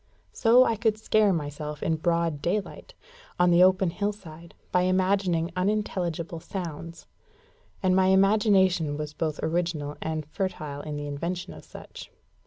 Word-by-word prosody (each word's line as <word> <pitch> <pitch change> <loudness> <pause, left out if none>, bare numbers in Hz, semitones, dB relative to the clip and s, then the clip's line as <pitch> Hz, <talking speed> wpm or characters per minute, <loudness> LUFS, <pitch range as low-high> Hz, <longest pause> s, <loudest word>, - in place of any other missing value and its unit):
So 240 +2 +5
I 230 -3 0
could 220 -1 +1
scare 215 -1 +2
myself 150 -2 -4
in 160 - 0
broad 170 -2 0
daylight, 205 - -3 0.4
on 180 0 +4
the 175 +1 +5
open 185 -1 +4
hillside, 170 -4 -6 0.2
by 180 - +3
imagining 185 -3 +1
unintelligible 180 -4 -2
sounds; 165 -2 -7 0.8
and 185 -1 +3
my 190 0 +4
imagination 190 -5 +3
was 150 0 -5
both 155 -1 -3
original 160 -3 -2
and 160 -1 -3
fertile 155 -4 -4
in 150 0 -6
the 145 0 -5
invention 170 +5 -4
of - - -12
such. - - -11
175 Hz, 140 wpm, -26 LUFS, 155-190 Hz, 0.8 s, So